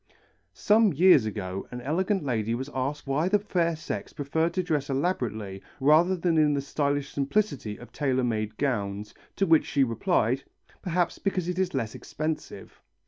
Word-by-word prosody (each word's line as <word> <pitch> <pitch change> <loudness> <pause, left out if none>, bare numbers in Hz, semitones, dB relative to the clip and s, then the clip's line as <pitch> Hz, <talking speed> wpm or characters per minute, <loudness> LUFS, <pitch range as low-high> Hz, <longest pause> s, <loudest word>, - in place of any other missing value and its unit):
Some 215 -2 +4
years 150 -7 +6
ago 95 -2 -5
an 125 - -6
elegant 180 - 0
lady 115 -4 -1
was 130 +4 -5
asked 135 +3 -2
why 145 +6 +1
the 205 - +4
fair 175 -5 0
sex 155 +1 -5
preferred 160 +3 0
to 185 - +1
dress 150 -5 -1
elaborately 115 - -2 0.2
rather 155 +7 +5
than 170 -2 +1
in 150 -1 +4
the - - 0
stylish 140 0 -1
simplicity 140 - -1
of 120 - -13
tailor 130 -3 0
made 110 -3 -2
gowns, 105 -6 -2 0.2
to 195 - +2
which 160 -3 +4
she 140 - +2
replied, 130 - +1 0.4
"Perhaps 175 -1 -1
because 185 -3 -1
it 180 0 -2
is 190 -6 0
less 115 -5 -2
expensive." 155 0 -5
145 Hz, 165 wpm, -27 LUFS, 125-175 Hz, 0.4 s, years